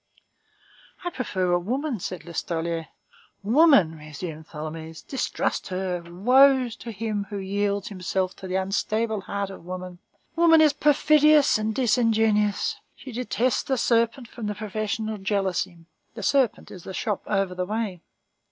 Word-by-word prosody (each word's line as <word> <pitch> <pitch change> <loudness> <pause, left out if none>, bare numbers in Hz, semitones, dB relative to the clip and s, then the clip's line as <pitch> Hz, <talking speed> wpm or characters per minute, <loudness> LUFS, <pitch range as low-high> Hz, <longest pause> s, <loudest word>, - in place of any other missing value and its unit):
"I 350 - -2
prefer 190 - -1
a 175 - +3
woman," 250 - -2
said 180 0 -6
Listolier. 165 -1 -3 0.6
"Woman," 235 - +5
resumed 155 +1 -8
Tholomyès; 160 +1 -7
"distrust 270 - -2
her. 185 -1 -2
Woe 250 +9 +4
to 230 +1 -8
him 210 -1 -3
who 205 - -4
yields 200 +1 -1
himself 185 -1 -2
to 190 - -8
the 185 - -3
unstable 215 +3 0
heart 200 +1 -4
of 190 - -11
woman! 180 0 -7 0.4
Woman 330 -1 +6
is 305 -2 +5
perfidious 300 -2 +4
and 215 0 -2
disingenuous. 220 -4 +2 0.2
She 265 - -10
detests 250 +1 0
the 265 - -1
serpent 235 +1 +1
from 225 -2 -6
professional 215 +1 -3
jealousy. 190 -3 -2 0.3
The 220 - -6
serpent 265 +2 +1
is 180 - -10
the 190 - -7
shop 210 -5 -2
over 195 -3 0
the 180 0 -3
way." 210 -4 -3
205 Hz, 140 wpm, -25 LUFS, 185-240 Hz, 0.6 s, Woman